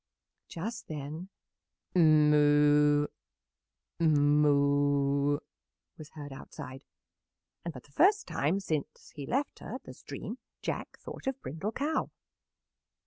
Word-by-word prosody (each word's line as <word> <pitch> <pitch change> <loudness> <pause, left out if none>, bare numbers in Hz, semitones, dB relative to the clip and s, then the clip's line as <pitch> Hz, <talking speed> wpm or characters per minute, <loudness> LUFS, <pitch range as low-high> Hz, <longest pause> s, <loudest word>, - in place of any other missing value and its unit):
Just 220 +7 -6
then, 155 +4 -6 0.6
"Moo, 150 -2 +5 0.9
moo!" 145 -2 +3 0.6
was 155 - -11
heard 145 -3 -8
outside, 135 0 -9 0.8
and 170 - -3
for 130 -5 -10
the 145 - -23
first 405 - +4
time 160 +8 0
since 155 -7 -4
he 140 -2 -7
left 275 +3 -1
her - - -7
at - - -8
the - - -10
stream - - -7 0.2
Jack - - -4
thought - - -9
of 270 0 -1
Brindle 175 +10 -4
Cow. 300 +3 -1
150 Hz, 110 wpm, -30 LUFS, 145-170 Hz, 0.9 s, Moo